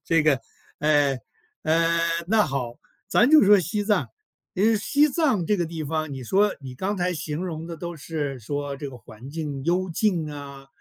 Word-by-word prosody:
这 165 -2 +3
个， 150 -4 +3 0.4
呃 145 -2 +3 0.5
呃， 165 +1 +2 0.3
那 215 +1 +4
好， 125 -4 -3 0.3
咱 240 +6 +4
就 310 -4 +8
说 205 +1 +7
西 195 +4 -1
藏。 210 -3 +1 0.5
因 195 +3 +2
为 225 -1 +4
西 290 +8 +3
藏 265 - +1
这 210 - +2
个 175 - 0
地 160 -1 -5
方， 155 0 -2
你 130 - -6
说 200 - +2
你 130 -2 -8
刚 190 +9 -2
才 180 -2 -1
形 155 +1 -4
容 165 -3 -5
的 170 - -6
都 170 +1 -6
是 145 -3 -4
说 145 +4 -4
这 140 -1 -6
个 125 - -11
环 115 +4 -12
境 145 -3 -4
幽 180 +3 +1
静 170 -4 0
啊， 140 -2 -9
160 Hz, 205 characters per minute, -25 LUFS, 145-190 Hz, 0.5 s, 就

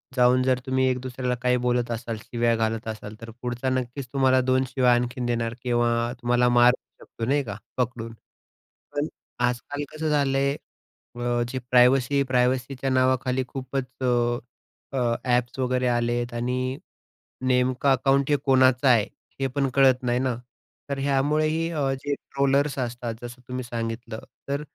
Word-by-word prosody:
जाऊन 125 0 +4
जर 130 -1 +2
तुम्ही 130 0 +1
एक 125 0 0
दुसऱ्याला 125 -1 -2
काही 125 0 +3
बोलत 120 -1 +1
असाल, 115 -1 -4
शिव्या 120 -1 +1
घालत 115 0 -1
असाल, 110 -1 -6
तर 115 - -8
पुढचा 125 +1 -2
नक्कीच 130 +1 -3
तुम्हाला 130 -1 +4
दोन 130 +1 +2
शिव्या 125 -1 +3
आणखीन 125 +1 -1
देणार 115 -1 -1
किंवा 120 -1 +1
तुम्हाला 125 0 +3
मारूही 120 +1 +2
शकतो. 115 - -6
नाही 140 +3 +2
का, 100 -4 -6 0.2
पकडून. 115 -2 -2 0.8
पण 145 +1 0 0.4
आजकाल 125 +4 -3
कसं 155 0 -2
झालं 140 -2 +2
आहे, 140 +1 +2 0.6
अ, 120 0 0
जे 130 - -3
प्रायव्हसी 125 +2 +5
प्रायव्हसीच्या 125 +1 +1
नावाखाली 130 0 +2
खूपच 130 -1 -5 0.9
अ, - - -1 0.4
एप्स 125 +1 -2
वगैरे 125 0 +1
आलेत 120 0 0
आणि 130 +2 -2 0.7
नेमकं 130 +1 +2
अकाउंट 135 +2 +2
हे 145 - +4
कोणाचं 130 -1 +4
आहे, 115 -5 +5 0.3
हे 135 - +2
पण 135 +1 -1
कळत 130 -2 +5
नाही 125 0 +1
ना 130 -2 0 0.5
तर 140 - -2
ह्यामुळेही 150 +4 +1 0.3
जे 145 0 -1
ट्रोलर्स 140 +1 0
असतात, 120 -2 -3
जसं 120 +1 -8
तुम्ही 125 0 -4
सांगितलं 115 -1 -5 0.3
तर 140 +1 -1
125 Hz, 150 wpm, -25 LUFS, 120-135 Hz, 0.9 s, प्रायव्हसी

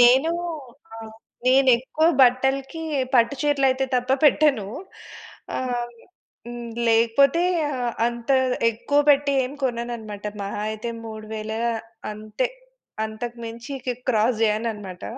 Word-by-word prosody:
నేను 260 +6 +6 0.7
ఆహ్, 225 -1 -9 0.3
నేనెక్కువ 260 +3 +4 0.2
బట్టలకి 265 +5 +2 0.3
పట్టు 235 +1 +4
చీరలు 290 -2 +2
అయితే 260 +1 0
తప్ప 250 0 0
పెట్టను. 290 -8 +4 0.9
ఆహ్, 245 -2 -2 0.6
హ్మ్, 240 -1 -7 0.2
లేకపోతే 235 +8 +4 0.3
ఆహ్, 250 -3 -2
అంత 235 +1 -4 0.4
ఎక్కువ 285 +6 +1
పెట్టి 285 0 +3
ఏం 255 - -5
కొననన్నమాట. 235 -4 -3 0.2
మహా 200 +1 -4
అయితే 220 +2 -4
3000 220 0 -6 0.6
అంతే. 215 - -3 0.6
అంతకు 230 +2 -6
మించి 230 +3 -8
ఇక 255 - -4 0.2
క్రాస్ 225 -1 +2
జేయనన్నమాట. 210 -4 -2
240 Hz, 105 wpm, -23 LUFS, 220-265 Hz, 0.9 s, నేను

